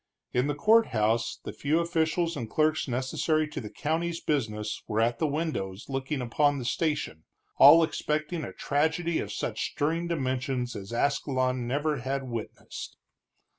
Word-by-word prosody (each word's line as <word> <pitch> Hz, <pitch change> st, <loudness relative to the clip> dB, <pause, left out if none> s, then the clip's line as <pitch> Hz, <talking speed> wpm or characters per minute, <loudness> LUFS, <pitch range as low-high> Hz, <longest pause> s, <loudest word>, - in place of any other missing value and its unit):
In 125 Hz, +3 st, +2 dB
the 145 Hz, -, -1 dB
courthouse 120 Hz, -, +3 dB
the -, -, -5 dB
few 150 Hz, +3 st, 0 dB
officials 170 Hz, 0 st, 0 dB
and 115 Hz, -2 st, -5 dB
clerks 155 Hz, +4 st, +1 dB
necessary 135 Hz, +5 st, 0 dB
to 150 Hz, -, -5 dB
the 105 Hz, -, -7 dB
county's 165 Hz, +5 st, -2 dB
business 110 Hz, -7 st, -2 dB
were 110 Hz, 0 st, -1 dB
at 115 Hz, +1 st, +1 dB
the 160 Hz, -, +2 dB
windows 140 Hz, -, -3 dB
looking 135 Hz, +1 st, -2 dB
upon 145 Hz, +4 st, +2 dB
the 125 Hz, -, -5 dB
station, 150 Hz, -, -1 dB, 0.3 s
all 155 Hz, +5 st, +9 dB
expecting 155 Hz, +1 st, -2 dB
a -, -, -5 dB
tragedy 160 Hz, +4 st, 0 dB
of -, -, -4 dB
such -, -, -2 dB
stirring 165 Hz, +4 st, 0 dB
dimensions 130 Hz, -5 st, -2 dB
as 100 Hz, +1 st, -7 dB
Ascalon 130 Hz, -1 st, 0 dB
never 145 Hz, +3 st, 0 dB
had 135 Hz, +2 st, -2 dB
witnessed. 115 Hz, -4 st, -7 dB
140 Hz, 150 wpm, -28 LUFS, 125-160 Hz, 0.3 s, all